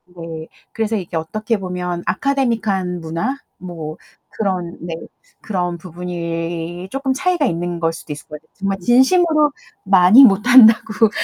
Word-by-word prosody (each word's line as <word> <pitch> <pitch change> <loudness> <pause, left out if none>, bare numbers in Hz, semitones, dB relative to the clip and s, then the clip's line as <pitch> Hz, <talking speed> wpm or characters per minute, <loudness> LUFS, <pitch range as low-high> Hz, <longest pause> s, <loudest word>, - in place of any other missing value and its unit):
네, 165 -3 -9 0.3
그래서 225 0 -1
이게 180 -5 -5
어떻게 215 +8 -2
보면 180 -2 -4
아카데믹한 220 -9 -1
문화 165 +12 -3 0.2
뭐 165 -4 -7 0.3
그런 185 -5 -3
네, 170 -1 -5 0.5
그런 180 -4 -2
부분이 170 0 -5
조금 270 0 -1
차이가 345 +2 0
있는 175 -4 -2
걸 165 -1 0
수도 165 - -9
있을 150 0 -8
것 150 0 -9
같아요. - - -37
정말 195 0 -3
진심으로 300 - +3 0.3
많이 190 +6 +7
못 210 -2 +4
한다고 225 -2 +6
185 Hz, 295 characters per minute, -19 LUFS, 170-230 Hz, 0.5 s, 많이